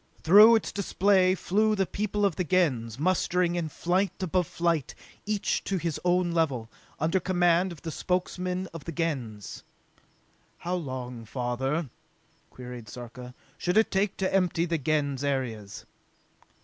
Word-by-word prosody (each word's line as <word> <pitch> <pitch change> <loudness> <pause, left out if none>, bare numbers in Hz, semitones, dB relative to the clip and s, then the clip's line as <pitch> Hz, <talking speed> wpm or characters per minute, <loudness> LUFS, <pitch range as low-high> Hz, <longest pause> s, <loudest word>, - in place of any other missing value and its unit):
Through 210 +7 +8
its 220 - 0
display 190 -1 +2
flew 215 +4 +1
the 195 -1 +1
people 205 +1 -1
of 190 -5 +1
the 185 - -1
Gens, 135 -11 +1
mustering 180 +2 +1
in 170 -2 -2
flight 180 +4 0
above 180 -1 0
flight, 170 -5 -1 0.3
each 210 -1 0
to 195 - -1
his 170 -3 -2
own 175 0 +2
level, 135 -9 0 0.3
under 165 +5 +1
command 175 0 +2
of 165 - -11
the 165 - -4
Spokesmen 180 +1 -2
of 165 -4 -8
the 170 - -4
Gens. 135 - -4 0.9
"How 175 - -4
long, 130 -8 -5
father," 130 +5 -2 0.6
queried 125 -3 -9
Sarka, 125 +2 -9 0.2
"should 180 +3 0
it 220 - +4
take 195 0 0
to 190 -1 -1
empty 180 -3 +2
the 165 -2 -1
Gens 145 -2 0
areas?" 120 -8 -3
170 Hz, 145 wpm, -27 LUFS, 135-185 Hz, 0.9 s, Through